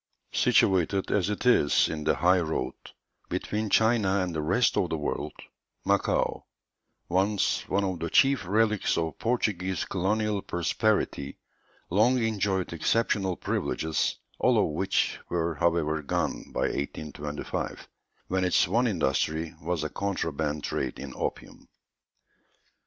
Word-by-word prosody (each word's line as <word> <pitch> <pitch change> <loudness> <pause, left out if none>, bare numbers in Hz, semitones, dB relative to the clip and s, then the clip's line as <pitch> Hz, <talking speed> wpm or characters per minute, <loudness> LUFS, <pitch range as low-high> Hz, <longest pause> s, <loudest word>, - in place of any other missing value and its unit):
Situated 95 0 +2
as 100 -1 +1
it 105 +4 -3
is 95 -12 +4
in 75 -1 -4
the - - +3
high 90 +1 +4
road, 80 -2 -2 0.6
between 105 0 -2
China 105 -3 +3
and 90 -2 -2
the 80 - -1
rest 95 +10 +2
of 90 - +1
the 80 - -1
world, 75 - -3 0.5
Macao, 100 0 +1 0.6
once 95 +3 +1
one 100 +2 +1
of 95 -3 -2
the 85 0 -3
chief 135 +8 +4
relics 110 +1 +2
of 80 -2 -2
Portuguese 95 -6 0
colonial 105 +2 0
prosperity, 90 -5 -1 0.5
long 110 +7 +4
enjoyed 100 -6 0
exceptional 95 +2 +1
privileges, 80 -2 -1 0.2
all - - +3
of - - +2
which 95 +6 0
were, 85 -1 0
however, 80 0 +1
gone 70 - -2
by - - -2
1825, 75 0 -4 0.4
when 95 0 0
its 90 - +3
one 120 +7 +2
industry 80 - 0
was 85 0 -2
a 75 - -2
contraband 80 -6 -2
trade - - -2
in 70 -2 -7
opium. - - -5
90 Hz, 130 wpm, -27 LUFS, 80-105 Hz, 0.6 s, is